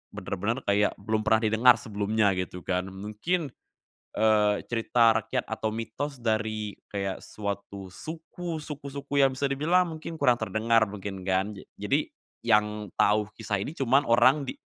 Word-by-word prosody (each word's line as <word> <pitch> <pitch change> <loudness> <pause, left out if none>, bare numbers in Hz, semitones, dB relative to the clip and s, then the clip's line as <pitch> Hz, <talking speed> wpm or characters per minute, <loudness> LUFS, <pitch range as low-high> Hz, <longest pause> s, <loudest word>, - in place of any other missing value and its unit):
bener-bener 110 +7 -2
kayak 100 +1 +3
belum 110 +2 -1
pernah 110 +1 +4
didengar 115 +3 +6
sebelumnya, 105 -1 +1
gitu 90 0 -5
kan. 90 0 -1
Mungkin, 105 - -3 0.6
eee, 105 -1 +4 0.2
cerita 115 -1 +3
rakyat 120 +3 -2
atau 110 0 -3
mitos 115 +6 -4
dari 110 -3 -2
kayak 100 -2 -3
suatu 100 -2 -6
suku, 165 - -6
suku-suku 140 -1 -4
yang 135 -1 +4
bisa 140 +1 -1
dibilang 170 +5 +2
mungkin 160 +1 -7
kurang 125 -6 +3
terdengar 110 0 +2
mungkin 100 -2 -7
kan, 95 +2 +1
ja - - -11
jadi - - 0 0.3
yang 105 -2 +1
tahu 105 0 +3
kisah 105 -2 -2
ini 145 +11 -5
cuman 135 +1 +2
orang 130 +4 +4
di - - -4
110 Hz, 145 wpm, -27 LUFS, 105-135 Hz, 0.6 s, didengar